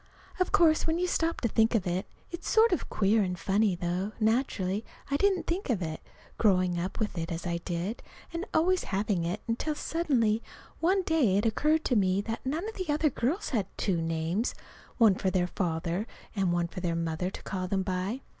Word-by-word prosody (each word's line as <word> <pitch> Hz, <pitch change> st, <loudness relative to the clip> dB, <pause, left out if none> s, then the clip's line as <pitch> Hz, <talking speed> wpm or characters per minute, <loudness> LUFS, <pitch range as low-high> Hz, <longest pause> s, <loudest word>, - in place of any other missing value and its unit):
Of 365 Hz, -, +1 dB
course, 320 Hz, -2 st, +4 dB
when 320 Hz, +1 st, +1 dB
you 360 Hz, -, +1 dB
stop 335 Hz, -2 st, 0 dB
to 235 Hz, -, +2 dB
think 225 Hz, +1 st, +3 dB
of 205 Hz, -, +1 dB
it, 180 Hz, +1 st, -1 dB, 0.2 s
it's 345 Hz, +1 st, -5 dB
sort 450 Hz, 0 st, +5 dB
of 355 Hz, -, -1 dB
queer 210 Hz, +2 st, +3 dB
and 180 Hz, -2 st, -1 dB
funny, 195 Hz, +2 st, +2 dB
though 180 Hz, +4 st, -2 dB
naturally 220 Hz, -3 st, +1 dB, 0.3 s
I -, -, +3 dB
didn't 385 Hz, +2 st, +2 dB
think 345 Hz, 0 st, -2 dB
of 230 Hz, -6 st, +2 dB
it, 160 Hz, -1 st, -4 dB, 0.4 s
growing 185 Hz, -4 st, +3 dB
up 185 Hz, +2 st, -3 dB
with 215 Hz, -4 st, -1 dB
it 165 Hz, +1 st, -4 dB
as 165 Hz, +1 st, -4 dB
I 170 Hz, -1 st, -1 dB
did, 175 Hz, +6 st, -3 dB, 0.3 s
and 335 Hz, +1 st, -2 dB
always 365 Hz, +3 st, +2 dB
having 195 Hz, -3 st, 0 dB
it, 180 Hz, +5 st, -2 dB
until 245 Hz, +7 st, -1 dB
suddenly 250 Hz, -11 st, +1 dB, 0.4 s
one 375 Hz, +3 st, +2 dB
day 285 Hz, -, +3 dB
it 205 Hz, -, +1 dB
occurred 305 Hz, +8 st, +2 dB
to 250 Hz, -, +2 dB
me 190 Hz, -2 st, +3 dB
that 225 Hz, +2 st, -4 dB
none 315 Hz, +9 st, -2 dB
of 445 Hz, -, -5 dB
the 370 Hz, -4 st, -4 dB
other 300 Hz, 0 st, +2 dB
girls 280 Hz, -, -1 dB
had 215 Hz, -, 0 dB
two 180 Hz, -5 st, 0 dB
names, 165 Hz, +7 st, -1 dB, 0.4 s
one 225 Hz, -4 st, +6 dB
for 190 Hz, 0 st, 0 dB
their 185 Hz, -1 st, +1 dB
father, 175 Hz, +2 st, -1 dB, 0.3 s
and 190 Hz, -3 st, +1 dB
one 175 Hz, 0 st, +1 dB
for 170 Hz, -, -7 dB
their 175 Hz, -2 st, -1 dB
mother 165 Hz, +2 st, -1 dB
to -, -, -9 dB
call 185 Hz, -2 st, -3 dB
them 190 Hz, 0 st, 0 dB
by. 190 Hz, +7 st, -2 dB
210 Hz, 205 wpm, -29 LUFS, 180-300 Hz, 0.4 s, one